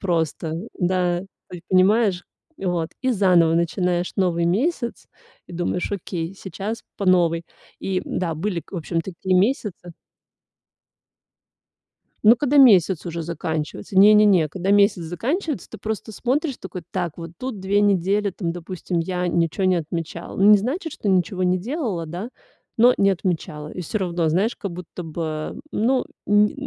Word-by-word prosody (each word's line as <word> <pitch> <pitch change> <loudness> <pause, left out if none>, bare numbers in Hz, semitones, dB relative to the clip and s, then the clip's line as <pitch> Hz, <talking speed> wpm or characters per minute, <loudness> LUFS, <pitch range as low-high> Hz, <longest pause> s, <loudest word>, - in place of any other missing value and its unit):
просто. 165 -3 -1 0.2
Да, 180 -1 +1
ты 195 - -10 0.3
ведь 170 - -13
понимаешь, 190 0 +3 0.3
и - - -8
вот, 170 -2 -1
и 260 -1 +2
заново 180 -5 +4
начинаешь 175 +1 0
новый 175 -3 +1
месяц 235 - -1 0.4
и - - -12
думаешь: 175 +1 -2
"Окей, 175 -2 -4
сейчас 195 +4 -6
по 200 - -3
новой". 170 -2 +3 0.4
И 190 -1 -1
да, 170 -3 -2
были, 175 +1 -2
в 190 - -6
общем-то, 170 +2 -3
такие 185 +2 0
месяцы 195 -4 0 2.3
Но 225 +3 +8
когда 290 +2 +1
месяц 190 - +6
уже 170 0 -4
заканчивается, 160 +2 -4
не-не-не, 205 -4 +6
когда 190 +3 -1
месяц 200 -3 +4
заканчивается, 265 - -3
ты 220 - -9
просто 220 +2 -4
смотришь 265 +5 -1
такой: 180 - -7
"Так, 175 -4 -3
вот 165 -1 -7
тут 255 -6 -5
2 200 +2 +1
недели, 200 +1 +2
там, 170 -2 -3
допустим, 175 0 -4
я 180 +1 -1
ничего 170 +2 0
не 185 -1 +4
отмечала". 165 0 -5
Ну, 195 +2 +5
не 210 - +8
значит, 290 - -3
что 205 - -2
ничего 185 0 +1
не 180 0 +2
делала, 215 - -3
да, 180 +9 -6 0.5
но 245 +2 +6
не 195 0 +4
отмечала. 160 -5 -2
И 180 - -6
всё 210 +6 -3
равно, 175 -3 0
знаешь, 195 +9 +1
как 200 -4 -5
будто 180 0 -8
бы, 155 -1 -4
ну, 250 +4 +1 0.2
нь 205 +1 +4
185 Hz, 155 wpm, -22 LUFS, 170-210 Hz, 2.3 s, Но